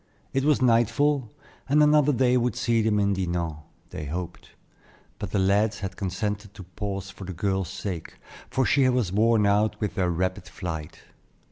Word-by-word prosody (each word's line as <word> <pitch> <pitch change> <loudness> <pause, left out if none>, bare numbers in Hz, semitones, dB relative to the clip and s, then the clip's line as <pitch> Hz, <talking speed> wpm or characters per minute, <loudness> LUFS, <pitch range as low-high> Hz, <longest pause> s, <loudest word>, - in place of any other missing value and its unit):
It 135 - +1
was 150 -3 +3
nightfall, 125 +2 +2 0.4
and 150 +2 +5
another 150 -1 +5
day 125 -1 +3
would 125 0 +1
see 115 -2 +1
them 110 -1 +2
in 100 0 +2
Dinan, 85 -4 -2 0.3
they 75 - -6
hoped; 85 +4 -6 0.7
but 105 - -4
the 100 - -1
lads 100 +2 +2
had 95 -1 -4
consented 105 +2 -3
to 95 - -9
pause 100 +1 -5
for 100 0 -10
the 95 - -5
girl's 95 0 -1
sake, 95 -3 -5 0.3
for 130 - +1
she 135 -2 +4
was 125 -8 0
worn 110 0 +3
out 105 +2 +2
with 105 -3 -2
their 90 -2 0
rapid 90 +1 -2
flight. 80 -2 -6
100 Hz, 170 wpm, -26 LUFS, 95-120 Hz, 0.7 s, and